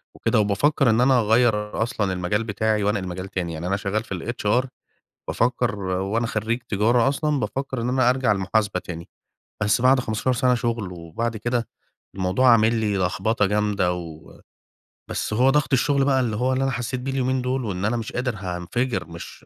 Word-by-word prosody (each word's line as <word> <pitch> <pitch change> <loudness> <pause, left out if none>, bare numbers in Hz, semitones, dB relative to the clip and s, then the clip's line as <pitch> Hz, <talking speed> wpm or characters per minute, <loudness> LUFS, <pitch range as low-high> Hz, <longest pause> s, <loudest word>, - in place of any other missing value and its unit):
وكده، - - +1
وبافكّر 120 +6 +2
إن 115 +2 +3
أنا 130 -1 +4
أغيّر 110 -1 +2
أصلًا 105 -5 -1
المجال 95 +5 -1
بتاعي 110 0 0
وأنقل 100 -2 0
مجال 95 +2 -5
تاني 90 -4 -3
يعني 80 +3 -5
أنا 95 +2 0
شغّال 105 +3 -2
في 100 - -5
الHR 120 +4 0 0.6
بافكّر 105 -6 0
هو 100 +4 -1
أنا 115 0 0
خرّيج 115 +3 -2
تجارة 115 +5 +3
أصلًا 145 0 0
بافكّر 135 -2 -3
إن 120 - -1
أنا 130 -1 +3
أرجع 130 -3 +2
المحاسبة 100 0 0
تاني 85 -2 -8 0.5
بس 105 +3 +2
بعد 130 +1 +5
15 110 +3 -1
سَنة 125 +1 +2
شُغل، 115 -5 -2
وبعد 90 +8 -4
كده 120 +2 -2 0.5
الموضوع 95 +7 +2
عامل 115 0 +4
لي 110 -3 0
لخبطة 105 +4 +1
جامدة، 105 -3 +1
و 80 -3 -10 0.7
بس - - -3
هو 125 +5 +4
ضغط 150 0 +1
الشُغل 135 +2 +3
بقى 135 -1 +3
اللي 120 -4 0
هو 125 +4 +1
اللي 130 +1 0
أنا 135 - +1
حسّيت 125 0 -3
بيه 130 +2 -4
اليومين 130 -1 0
دُول 130 0 -1
وإن 95 -2 -3
أنا 115 +3 +1
مش 115 - -5
قادر 125 -1 -2
هانفجر، 95 +5 -3
مش 85 0 -10
110 Hz, 185 wpm, -23 LUFS, 100-125 Hz, 0.7 s, بعد